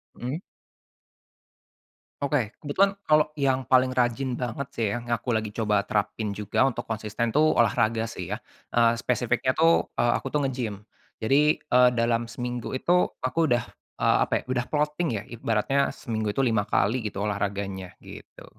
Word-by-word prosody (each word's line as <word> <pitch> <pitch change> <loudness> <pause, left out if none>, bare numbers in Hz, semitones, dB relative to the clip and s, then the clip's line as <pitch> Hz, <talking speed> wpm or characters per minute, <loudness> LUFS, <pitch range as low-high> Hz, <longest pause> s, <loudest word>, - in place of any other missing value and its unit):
Mhm. 135 +8 -4 1.8
Oke. 135 -6 0
Kebetulan, 195 +7 +2
kalo 150 -3 +3
yang 135 -3 0
paling 130 0 +4
rajin 125 +1 0
banget 125 +2 -3
sih, 115 - +1
ya, 120 - -3
yang 120 - -11
aku 120 +1 -1
lagi 110 -1 -1
coba 105 -3 +2
terapin 110 +1 -2
juga 105 +6 +2
untuk 125 - -5
konsisten 110 +1 -3
tuh, 155 +1 +3
olahraga 115 -1 +2
sih, 95 -5 -7
ya. 105 - -2 0.3
Eee, 115 -1 +4
spesifiknya 125 +2 0
tuh, 165 +1 +4
eee, 120 0 +3
aku 135 - -5
tuh 145 0 0
nge-gym. 115 -6 -4 0.3
Jadi, 145 +7 +3
eee, 125 -3 +4
dalam 115 0 +1
seminggu 120 +1 -4
itu, 180 +6 +2 0.2
aku 130 +6 -1
udah 120 0 +2 0.3
eee, - - +3
apa - - 0
ya, - - -4
udah 125 -1 -1
plotting 150 +2 0
ya. - - -4
Ibaratnya 120 +4 0
seminggu 110 -6 -3
itu 130 +6 +1
5 110 -3 +2
kali, 120 +5 +2
gitu 100 +1 -4
olahraganya, 100 -2 -3
gitu. - - -12
120 Hz, 160 wpm, -26 LUFS, 110-135 Hz, 1.8 s, paling